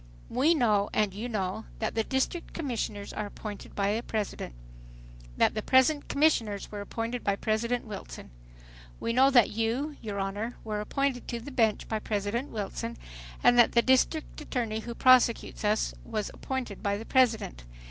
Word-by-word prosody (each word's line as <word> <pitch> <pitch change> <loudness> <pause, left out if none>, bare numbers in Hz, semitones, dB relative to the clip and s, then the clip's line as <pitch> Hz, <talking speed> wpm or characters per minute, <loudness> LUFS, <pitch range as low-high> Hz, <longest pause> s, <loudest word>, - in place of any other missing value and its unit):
"We 285 +8 +3
know 210 -7 +2
and 210 -3 +1
you 220 +5 -5
know, 190 -5 -2
that - - -2
the 225 - +1
District 265 +8 -2
Commissioners 230 -9 -3
are 210 -1 -3
appointed 205 0 -8
by 200 0 +1
the 230 - -1
President, 210 - -4 0.8
that - - +4
the 215 - -2
present 260 +5 +3
commissioners 235 -9 +1
were 205 -1 -5
appointed 230 +3 -4
by 200 - +1
President 230 +4 -1
Wilson. 205 - -8 0.7
We 230 - -1
know 265 +3 +6
that 245 -5 +5
you, 235 +7 -1
your 210 -3 -4
Honor, 205 +4 -3
were 210 -1 -3
appointed 270 +3 -1
to 235 - -3
the 255 +5 -9
bench 225 -5 +1
by 220 - -1
President 215 +5 -2
Wilson, 195 - -4 0.5
and 245 - +6
that 240 - +6
the 235 - +5
district 260 +5 +2
attorney 230 -7 -2
who 235 +1 -6
prosecutes 255 -4 +4
us 210 +1 +1
was 215 -2 -3
appointed 260 -7 -4
by 200 0 0
the 225 - -7
President. 225 - +2
225 Hz, 170 wpm, -29 LUFS, 210-255 Hz, 0.8 s, know